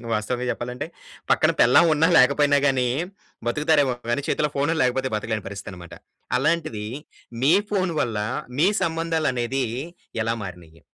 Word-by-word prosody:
వాస్తవంగ 120 +4 -2
చెప్పాలంటే 125 +1 -4 0.4
పక్కన - - +4
పెళ్ళాం 125 +8 +6
ఉన్నా 160 +2 +3
లేకపోయినా 145 +2 +4
గానీ, 130 -3 +2 0.6
బ‌తుకుతారేమో 145 -1 +2 0.2
గానీ 130 +4 0
చేతిల్లో 150 -1 +1
ఫోనుల్లేకపోతే 135 -3 +1
బ‌తకలేని 110 -2 -3
పరిస్థితనమాట. 95 -3 -9 0.4
అలాంటిదీ 150 -7 -1 0.6
మీ 145 - +5 0.2
ఫోన్ 185 -4 0
వల్లా 110 -3 -1 0.3
మీ 170 - +5
సంబంధాలనేదీ 155 -7 -1 0.6
ఎలా 115 +1 0
మారినియి? 85 -3 -11
130 Hz, 115 wpm, -23 LUFS, 115-155 Hz, 0.6 s, పెళ్ళాం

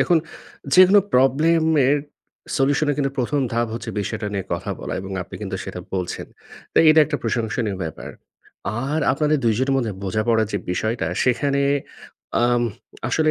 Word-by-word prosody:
দেখুন 175 -2 +4 0.6
যেকোনো 185 +2 +8
প্রবলেম 150 +6 +4 0.3
এর 145 - +4 0.6
সলিউশন 140 +3 +2
এর - - +1
কিন্তু 140 -1 +1
১ম 140 +3 0
ধাপ 120 +1 +1
হচ্ছে 115 0 -5
বিষয়টা 105 +1 -3
নিয়ে 100 -2 -2
কথা 85 - -3
বলা - - -4
এবং 95 +1 -8
আপনি - - -12
কিন্তু - - -3
সেটা - - -6
বলছেন। 90 -2 -3 0.5
তো - - +3
এটা 155 0 +7
একটা - - -2
প্রশংসনীয় 110 -2 -1
ব্যাপার। 80 - -7 0.8
আর 150 +3 0
আপনাদের 150 +2 +1
২ 115 -2 +3
জনের 135 +1 +1
মধ্যে 120 -5 -1
বোঝাপড়া 110 +3 +1
যে 100 - 0
বিষয়টা 110 +1 -1 0.2
সেখানে 140 +2 +1 0.8
আম 120 0 +3 0.5
আসলে 155 -1 +2
125 Hz, 160 wpm, -22 LUFS, 110-145 Hz, 0.8 s, যেকোনো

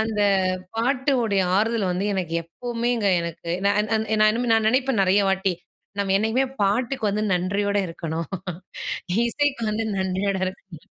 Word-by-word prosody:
அந்த 220 -1 0 0.5
பாட்டுடைய 245 -4 +1
ஆறுதல் 220 -1 +1
வந்து 185 +3 -1
எனக்கு 175 -3 -3
எப்பமேங்க 235 +5 -2
எனக்கு 170 0 -5 0.2
நா 200 - +5 0.2
நா 220 - +2 0.5
நா 225 - +6
நினைப்பேன் 255 0 +2
நெறைய 190 +2 +4
வாட்டி, 190 -1 +1 0.5
"நம்ம 200 -1 +1
என்னைக்குமே 225 +6 +1 0.2
பாட்டுக்கு 225 +3 +1
வந்து 210 +1 -1
நன்றியோட 200 +3 0
இருக்கணும்." 165 -1 -4 1.0
இசைக்கு 280 +1 0
வந்து 220 +1 -1
நன்றியோடு 190 +1 -1
இருக்கணும். 185 -3 -9
205 Hz, 125 wpm, -24 LUFS, 190-235 Hz, 1.0 s, நா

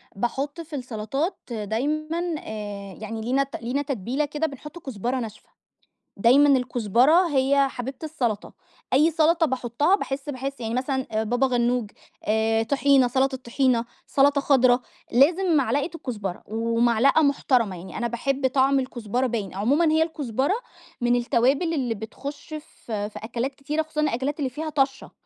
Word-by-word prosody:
باحطّ 275 - -2
في 310 -2 -8
السلطات 255 - -3
دايمًا، 305 - -2
آآ، 205 - -7
يعني 220 +1 -5
لينا 265 +4 +1
لينا 250 +5 -1
تتبيلة 270 +2 -2
كده 300 +2 -2
بنحطّ 300 +4 -9
كزبرة 250 - -3
ناشفة. 220 -3 -8 0.7
دايمًا 270 +7 +5
الكزبرة 250 - +3
هي 275 0 +3
حبيبة 255 +2 -6
السلطة، 245 -9 -2 0.4
أي 305 +5 +5
سلطة 325 +1 +3
باحطّها 260 - +1
باحس-باحس 275 -4 -4
يعني 225 -1 -3
مثلًا 255 -4 -1
بابا 245 +4 +1
غنوج، 240 -3 0 0.8
طحينة، 275 -2 +4
سلطة 265 +1 +1
طحينة، 245 -1 +1 0.2
سلطة 280 0 +3
خضرا، 255 -3 +4 0.3
لازم 330 +7 +4
معلقة 275 +4 +1
الكزبرة 205 - -5
ومعلقة 230 +5 +3
محترمة 255 -8 +2
يعني، 180 +3 -9
أنا 235 +1 -1
باحب 265 +3 0
طعم 270 +1 +3
الكزبرة 250 0 -2
باين، 215 -6 -3
عمومًا 275 - +2
هي 320 +1 +4
الكزبرة 285 - -1 0.5
من 240 0 +3
التوابل 265 +7 +2
اللي 250 -6 -1
بتخش 265 +7 -8
في 220 -8 -5
في - - -9
أكلات 245 +4 -3
كتيرة 300 +3 -2
خصوصًا 305 -1 -3
الأكلات 285 +1 -1
اللي 265 -3 0
فيها 310 +5 -5
طشَّة، 270 -2 -1
265 Hz, 140 wpm, -24 LUFS, 235-290 Hz, 0.8 s, دايمًا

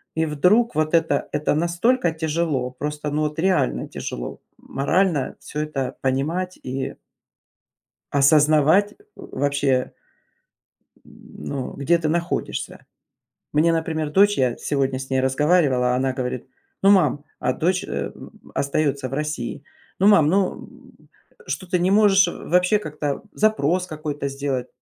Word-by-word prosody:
И 160 0 +1
вдруг 180 +9 +2
вот 155 +1 0
это- 160 -4 +1
это 150 0 0
настолько 175 +5 +1
тяжело, 160 -5 -1
просто, 150 +3 -4
ну, 150 +1 0
вот 150 +1 -3
реально 160 - +1
тяжело, - - -6 0.2
морально 155 0 0
всё 150 - -7
это 135 -4 -3
понимать 160 +8 -1
и 130 +1 -4 1.2
осознавать 155 +7 +4 0.2
вообще 140 -2 -1 1.1
м, - - -14
ну, 135 -3 -4
где 160 +5 +2
ты 160 -2 -1
находишься. 170 +2 -3 0.7
Мне, 160 +3 +3
например, 160 -2 -2
дочь, 205 +5 +4
я 125 -3 +1
сегодня 135 -2 -1
с 135 0 -7
ней 130 0 +2
разговаривала, 130 -2 +2
она 130 +1 0
говорит: 125 -1 -4 0.4
"Ну, 195 - +6
мам...". 180 -7 +3 0.2
А 125 - +1
дочь, 180 +7 0
э, - - -4
м, - - -12 0.2
остается 140 -1 0
в 130 - -6
России: 150 -5 -4 0.3
"Ну, 195 - +3
мам, 190 -8 +6
ну, 190 +3 +2
м, - - -15 0.4
что 185 - -4
ты 180 0 0
не 180 +2 +1
можешь 195 -2 +5
вообще 180 +4 +1
как-то 150 -6 -4
запрос 185 -5 +1
какой-то 150 -3 -4
сделать?". 135 -2 -3
150 Hz, 135 wpm, -22 LUFS, 135-175 Hz, 1.2 s, Ну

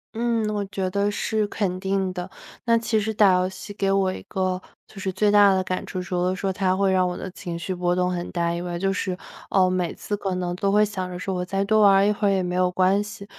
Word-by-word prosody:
嗯， 230 -1 0
我 205 -1 -2
觉 195 -1 -3
得 200 +2 0
是 215 +1 -1
肯 190 -3 -2
定 190 -1 -1
的， 180 0 -6 0.4
那 230 -1 +4
其 225 -1 0
实 220 +1 -2
打 205 -3 +5
游 180 0 +2
戏 190 +2 -8
给 200 -1 -1
我 195 -1 +2
一 - - -7
个 185 -1 -2 0.2
就 195 - -13
是 190 - -2
最 205 +2 +2
大 205 -1 +6
的 185 - +1
感 185 -1 -3
触， 185 - -4
除 180 -1 -2
了 180 +1 +1
说 190 +1 -2
它 185 -1 +1
会 195 0 +2
让 185 -1 +3
我 180 - -3
的 185 - -6
情 175 -3 -6
绪 170 +3 -4
波 175 0 0
动 180 0 +1
很 175 -1 -4
大 170 -2 0
以 170 - -3
外， 175 -1 -4
就 195 +2 0
是， 185 -1 -2 0.3
呃， 185 -1 +3
每 180 -2 -1
次 205 - -4
可 195 -2 -2
能 180 -1 -2
都 195 - 0
会 210 +1 +4
想 190 -3 -3
着 180 - -6
说 190 +1 -3
我 180 -1 -2
再 195 +2 -1
多 215 +2 +3
玩 200 -2 +7
儿 195 +1 +5
一 210 - +3
会 205 0 0
儿 200 - +3
也 190 -1 +1
没 180 0 -2
有 185 0 +3
关 190 +2 +3
系。 205 -1 -8
190 Hz, 295 characters per minute, -24 LUFS, 180-205 Hz, 0.4 s, 玩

